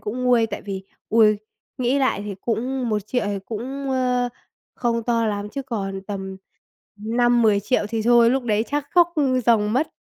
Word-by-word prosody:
cũng 240 +4 -4
nguôi, 245 -2 +4
tại 205 - -6
vì, 195 -1 -6 0.2
ôi, 215 -2 +4 0.4
nghĩ 255 +2 +1
lại 260 -7 +1
thì 205 - -5
cũng 245 +2 -2
1.000.000 215 +2 -1
thì 200 -1 -2
cũng, 265 +5 -5
ơ, 250 -1 +1 0.5
không 235 -1 -1
to 230 -1 +1
lắm, 205 -1 -2
chứ 275 +6 -5
còn 195 -6 -4
tầm 190 -1 -6 0.6
5.000.000-10.000.000 225 -1 +2
thì 225 0 -2
thôi, 235 0 +5
lúc 265 0 0
đấy 215 -1 +1
chắc 290 0 -2
khóc 345 -1 +4 0.3
ròng 215 -3 +3
mất. 270 +7 +1
230 Hz, 170 wpm, -22 LUFS, 210-250 Hz, 0.6 s, thôi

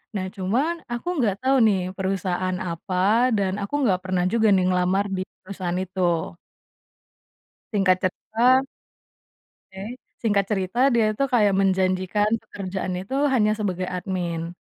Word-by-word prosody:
nah 190 -2 -2
cuman 235 - 0 0.2
aku 240 +6 -4
nggak 205 -5 +1
tahu 265 +1 +3
nih 200 -3 +2 0.2
perusahaan 185 -1 -1
apa 170 +3 -5 0.4
dan 195 -2 0
aku 200 - -6
nggak 185 -5 +2
pernah 185 -1 0
juga 225 -1 +3
nih 185 - +2
ngelamar 185 +2 +1
di 185 - -1 0.2
perusahaan 185 -2 -3
itu. 185 - -28 1.8
Singkat 195 -3 +3
cerita 235 +7 +2 1.1
Oke 195 +5 -7 0.3
singkat 205 -4 +2
cerita 190 +2 -1
dia 230 -2 +3
itu 275 - 0
kayak 210 -4 +4
menjanjikan 190 +1 +1 0.2
pekerjaan 190 -1 -5
itu 195 +8 -5 0.2
hanya 215 -4 +3
sebagai 185 -3 -2
admin 175 -2 -3
190 Hz, 130 wpm, -24 LUFS, 185-210 Hz, 1.8 s, kayak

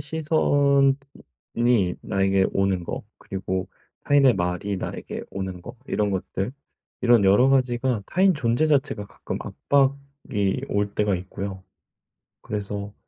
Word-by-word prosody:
시선이 145 -3 +2 1.1
나에게 95 -1 +2
오는 95 -2 +1
거 - - -5 0.2
그리고 95 -1 -4 0.4
타인의 140 -3 +5
말이 90 +2 -2
나에게 - - -5
오는 95 -2 -5
거 120 +4 -10
이런 105 -1 0
것들 95 +3 -3 0.5
이런 120 -4 +5
여러 105 +7 +5
가지가 125 -3 +1
타인 190 +1 +3
존재 120 +1 +1
자체가 135 -8 0
가끔 - - -6
압박이 140 -7 -1
올 100 0 0
때가 105 -2 +1
있고요. 95 +1 -6 0.8
그래서 100 -1 -5
105 Hz, 250 characters per minute, -24 LUFS, 95-135 Hz, 1.1 s, 타인의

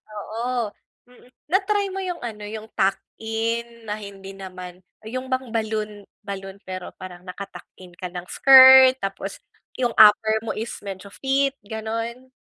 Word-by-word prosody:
Oo, 230 +1 -3 0.4
mm. 245 0 -20 0.2
Na-try 400 +2 +1
mo 385 +1 -5
yung 355 -2 -4
ano 215 -3 -6
yung 215 +1 -7
tuck-in 225 +3 -2
na 210 - -2
hindi 195 -1 -10
naman 185 -1 -9 0.2
yung 255 +3 -5
bang 260 -1 -1
balloon 215 -2 -2 0.2
balloon 195 -1 -7
pero 185 -1 -6
parang 180 -1 -10
nakatuck-in 185 -1 -11
ka 180 0 -7
ng 180 0 -7
skirt 260 -1 +8
tapos 195 -3 -5 0.4
yung 240 -2 0
upper 220 0 +6
mo 225 - -3
is 225 +2 -4
medyo 195 -1 -7
fit 275 0 +1
ganun? 225 +4 -5
220 Hz, 140 wpm, -23 LUFS, 195-250 Hz, 0.4 s, skirt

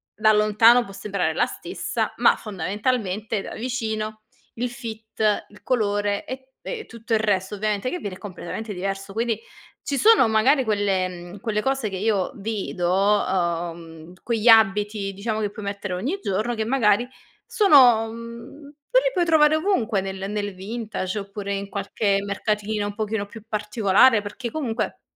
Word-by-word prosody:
da 215 0 +4
lontano 215 +3 +5
può 195 - -11
sembrare 200 0 -2
la - - +2
stessa. - - -3
Ma - - +5
fondamentalmente, 210 +1 -2
da - - -8
vicino, 220 -3 -3 0.3
il 245 +2 -2
fit, 220 -2 -2
il 210 -1 -18
colore 205 -4 0
e - - -4 0.3
e 485 - -3
e - - -9
tutto 230 0 -5
il 220 - +4
resto, 200 -3 0
ovviamente, 210 +3 -1
che 360 - -3
viene 200 -7 -5
è - - -12
completamente 205 +2 -6
diverso. 195 +1 -4
Quindi 225 0 -1 0.4
ci 280 - -2
sono, 440 - +6
magari, 250 +6 +3
quelle 205 -4 +1
mhmm, 175 +2 -9
quelle 210 +1 -1
cose 270 -4 -1
che 190 - -5
io 205 +1 0
vedo 195 -4 -2 0.4
uhm, 170 -2 -3
quegli 230 -1 -1
abiti, 210 -2 +4
diciamo, 215 +2 -3
che 205 - -1
puoi 210 0 -9
mettere 200 -2 -4
ogni 260 - -2
giorno. 215 +5 -1
Che 220 - -2
magari 235 -2 +2 0.4
sono 255 - +6
mhmm, 235 +5 -10 0.2
e - - +6
li - - 0
puoi 355 -3 +2
trovare 310 -2 +5
ovunque, 245 - +1
nel 190 0 -5
nel 205 -2 -3
vintage 210 -1 -4
oppure 200 0 -5
in 200 0 -4
qualche 200 0 0
mercatino 210 +1 -2
un 205 - -6
pochino 215 -1 -2
più 220 +1 -12
particolare. 210 +1 +3
Perché, 235 +4 -5
comunque, 250 -6 -3
215 Hz, 160 wpm, -23 LUFS, 200-230 Hz, 0.4 s, sono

